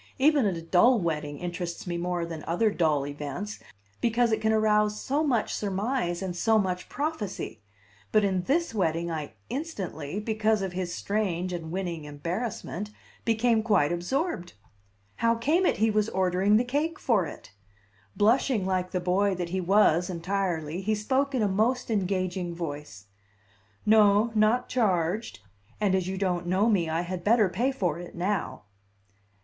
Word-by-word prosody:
Even 285 -3 +4
a 175 -4 -2
dull 220 +9 +4
wedding 150 -4 -2
interests 175 0 -5
me 175 -1 -3
more 175 0 -1
than 165 -2 -7
other 210 +6 +2
dull 155 -7 +1
events, 145 +8 -5 0.4
because 235 0 +2
it 220 - +1
can 220 - +2
arouse 210 -1 +2
so 285 +4 0
much 250 -8 +1
surmise 200 -2 -1
and 180 -2 -3
so 220 +5 +3
much 185 -3 -1
prophecy; 240 - -4 0.5
but 215 - +4
in 190 -2 +1
this 335 0 +1
wedding 170 -4 0
I 150 -7 -5 0.2
instantly, 200 - -4
because 215 -1 +1
of 190 -2 -3
his 180 -1 -3
strange 185 -3 -2
and 165 -2 -5
winning 175 -4 -3
embarrassment, 175 +6 -4 0.4
became 230 0 +2
quite 200 -10 +2
absorbed. 180 - -2 0.6
How 230 0 +2
came 310 +11 +2
it - - +1
he 220 +1 +3
was 215 +1 +1
ordering 190 +2 +2
the 235 - +2
cake 295 +6 -1
for 205 -9 +1
it? 95 - -11 0.6
Blushing 225 -1 +2
like 185 -1 0
the 180 - -1
boy 190 +2 +1
that 175 -1 -3
he 185 +2 -1
was 180 -2 +3
entirely, 175 -2 -2
he 215 +3 0
spoke 265 +6 0
in 240 - +1
a - - +3
most 230 +6 0
engaging 185 -3 -1
voice: 145 - -6 0.8
"No, 210 +1 +5
not 220 +3 +3
charged; 185 - 0 0.4
and 205 -3 +2
as 185 -1 +1
you 190 0 -3
don't 180 -2 -1
know 190 +5 +2
me, 175 -6 +1
I 165 +1 0
had 175 0 -5
better 215 -1 +4
pay 235 +10 0
for 175 - -1
it 175 - -9
now." 190 +3 -2
195 Hz, 160 wpm, -27 LUFS, 175-220 Hz, 0.8 s, No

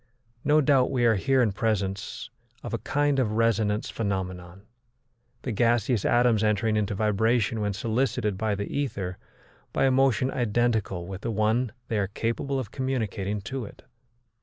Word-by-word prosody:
No 150 +1 +4
doubt 135 -3 +3
we 125 -3 +1
are 115 - +5
here 130 +5 +2
in 110 - +2
presence 100 -2 -2 0.3
of - - -6
a - - -1
kind 145 -1 +1
of 110 -5 +1
resonance 110 -2 +1
phenomenon, 95 -3 -4 0.8
the 130 - -2
gaseous 115 0 +2
atoms 120 -3 +3
entering 110 +1 +1
into 105 -1 0
vibration 110 +2 +1
when 105 0 0
solicited 110 0 0
by 105 +1 -1
the 100 +1 -5
ether 100 -10 -3 0.5
by - - +2
a 135 - +4
motion 130 0 +2
identical 110 -6 0
with 95 +1 -7
the 115 - -3
one 110 +2 +1 0.2
they 110 - 0
are 100 - 0
capable 115 +7 -2
of 120 -5 -4
communicating 110 -6 -2
to 130 +5 -4
it. - - -13
110 Hz, 160 wpm, -26 LUFS, 100-125 Hz, 0.8 s, are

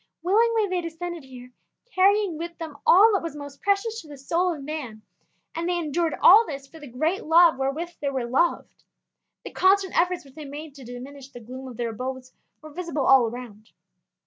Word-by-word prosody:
Willingly 445 +3 +2
they 365 -1 -1
descended 335 -1 -6
here, 250 -1 -12 0.4
carrying 395 -1 +3
with 340 +2 -7
them 320 -3 -7
all 420 +5 +7
that 395 - +1
was 330 -3 -6
most 285 -1 -10
precious 430 +3 0
to 315 - -16
the 290 -1 -11
soul 340 +7 0
of 300 -5 -6
man, 265 -8 -6 0.5
and 335 +2 -3
they 355 - 0
endured 330 0 -1
all 445 - +9
this 275 -9 -7
for 320 +4 -15
the 295 - -10
great 315 - -1
love 330 -2 +5
wherewith 290 +6 -2
they 285 - 0
were 260 -3 -2
loved. 270 +8 -1 0.6
The - - -8
constant 380 0 +2
efforts 355 -2 +1
which 270 - -17
they 305 0 -9
made 290 +2 -8
to 275 -2 -13
diminish 260 +3 -10
the 250 -3 -11
gloom 255 +3 -9
of 245 -3 -10
their 235 -1 -2
abodes 255 +2 -6 0.3
were 310 - -11
visible 335 -4 -3
all 265 -3 +6
around. 225 -2 -10
310 Hz, 200 wpm, -25 LUFS, 265-350 Hz, 0.6 s, all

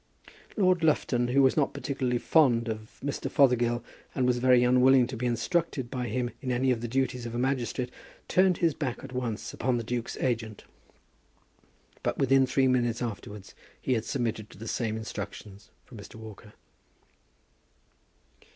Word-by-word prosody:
Lord 185 -4 +3
Lufton, 125 -6 +2
who 135 +3 +3
was 130 - +4
not 145 -3 +1
particularly 130 -3 -1
fond 120 -5 +3
of 110 0 -6
Mr. 145 - -3
Fothergill, 120 -3 +3 0.3
and 130 - +1
was 125 -1 +2
very 125 0 +5
unwilling 125 +1 +5
to 125 +1 -6
be 125 +2 -2
instructed 130 +2 -1
by 125 -3 -3
him 120 +2 -2
in 130 - -2
any 130 +1 +2
of 115 -2 -1
the 120 - -3
duties 125 -1 -1
of 115 - -6
a - - -2
magistrate, 125 -1 -1 0.4
turned 185 -2 +3
his 165 -3 +2
back 130 -4 -4
at 135 -1 -9
once 120 -4 -3
upon 125 0 0
the 115 - -3
duke's 120 +1 -4
agent; 110 -4 -2 1.4
but - - -1
within 135 0 +4
three 130 +1 +2
minutes 120 -2 +1
afterwards 105 -3 -7 0.3
he 130 - 0
had 110 -3 0
submitted 115 -5 -3
to - - -15
the 115 +3 -8
same 110 -2 -2
instructions 105 -1 -8 0.2
from 115 - -12
Mr. 100 - -12
Walker. 110 -1 -11
125 Hz, 165 wpm, -28 LUFS, 115-130 Hz, 1.4 s, very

